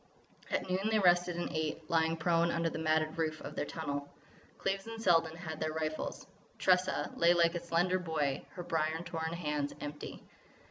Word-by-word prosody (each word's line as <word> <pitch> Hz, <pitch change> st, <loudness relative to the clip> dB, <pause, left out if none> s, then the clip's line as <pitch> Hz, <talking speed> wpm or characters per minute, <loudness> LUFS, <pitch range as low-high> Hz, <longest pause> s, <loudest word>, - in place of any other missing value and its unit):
At -, -, -1 dB
noon 190 Hz, +3 st, 0 dB
they 220 Hz, -, +3 dB
rested 175 Hz, -2 st, +4 dB
and 175 Hz, -, -3 dB
ate, 155 Hz, 0 st, -2 dB
lying 165 Hz, 0 st, +2 dB
prone 170 Hz, +1 st, +3 dB
under 165 Hz, -1 st, 0 dB
the -, -, -4 dB
matted 155 Hz, 0 st, +1 dB
roof 155 Hz, -1 st, 0 dB
of -, -, -7 dB
their -, -, -2 dB
tunnel. 145 Hz, -3 st, -4 dB, 0.5 s
Cleves 195 Hz, +2 st, -2 dB
and 225 Hz, 0 st, -6 dB
Selden 165 Hz, -6 st, +3 dB
had 160 Hz, -3 st, -6 dB
their 155 Hz, 0 st, -1 dB
rifles. 155 Hz, 0 st, -3 dB, 0.3 s
Tressa 185 Hz, 0 st, +2 dB
lay 170 Hz, +1 st, +5 dB
like 170 Hz, -1 st, +4 dB
a 175 Hz, -, -1 dB
slender 175 Hz, +2 st, +1 dB
boy, 155 Hz, -6 st, -1 dB
her 175 Hz, -, -5 dB
brier 160 Hz, 0 st, 0 dB
torn 165 Hz, -1 st, -3 dB
hands 150 Hz, -4 st, -2 dB
empty. 145 Hz, 0 st, -7 dB
165 Hz, 180 wpm, -33 LUFS, 155-175 Hz, 0.5 s, lay